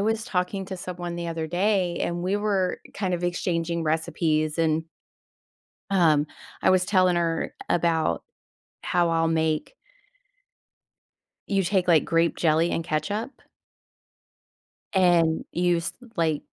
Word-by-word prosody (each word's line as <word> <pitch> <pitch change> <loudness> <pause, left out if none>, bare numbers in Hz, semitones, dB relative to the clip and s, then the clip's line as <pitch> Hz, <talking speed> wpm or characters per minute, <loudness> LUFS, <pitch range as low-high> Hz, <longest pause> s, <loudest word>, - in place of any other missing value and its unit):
was 220 +2 0
talking 185 +1 -2
to 190 - -5
someone 175 -1 -5
the 170 -1 -4
other 160 -1 -3
day, 180 +1 +1
and 175 0 -2
we 190 +3 0
were 200 -3 0
kind 190 -3 -1
of 175 0 -3
exchanging 170 -1 -1
recipes, 155 0 0
and 160 -1 +1 1.1
um, 160 -6 +4 0.4
I - - +5
was 185 -1 +4
telling 185 -2 +3
her 165 -1 -1
about 165 - +1 0.6
how 175 -1 +1
I'll 165 0 +2
make 160 - 0 1.7
you 195 -1 +2
take, 185 0 0
like, 165 -3 +5
grape 165 0 +1
jelly 160 +1 +2
and 165 - -2
ketchup 205 - -3 1.5
and 175 -4 +3
you 175 -1 +2
s 170 - -3 0.2
like, 160 -3 +1
175 Hz, 125 wpm, -25 LUFS, 165-185 Hz, 1.7 s, I